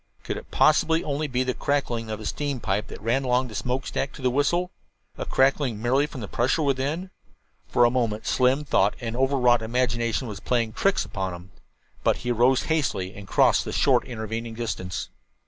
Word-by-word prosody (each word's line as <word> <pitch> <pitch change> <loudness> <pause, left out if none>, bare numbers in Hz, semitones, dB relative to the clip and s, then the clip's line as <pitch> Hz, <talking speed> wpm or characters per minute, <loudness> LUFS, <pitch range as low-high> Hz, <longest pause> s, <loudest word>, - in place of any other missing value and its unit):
Could - - -3
it - - -10
possibly 160 +1 +3
be - - -9
only 150 +1 -1
the 130 -1 0
crackling 120 -6 -1
of 110 - -3
the 110 - -9
steam 145 0 -2
pipe 105 -1 -1
that - - -9
ran 120 +4 +1
along 125 0 +1
the - - -10
smokestack 135 +3 -2
to 135 - -11
the 125 - +2
whistle 170 +7 +1 0.4
a - - -5
crackling 135 -4 +2
merely 130 +6 +2
from 135 -4 -8
the 105 - -5
pressure 130 - +1
within? 145 +7 -1 0.6
For 120 - +4
a 120 - +3
moment 115 -4 -1
Slim 130 +3 +2
thought 100 -7 +2
an 115 -2 -4
over 135 +2 +1
wrought 120 -2 +4
imagination 120 +1 0
was 105 -3 -6
playing 115 -1 0
tricks 195 - +1
upon 95 -3 -4
him. 90 +2 -13 0.5
But - - +3
he 125 - +1
rose 120 +2 +3
hastily 130 - -1
and 100 -1 -10
crossed - - +4
the - - -5
short - - +3
intervening 115 0 -5
distance. 105 -6 -4
125 Hz, 195 wpm, -25 LUFS, 110-135 Hz, 0.6 s, For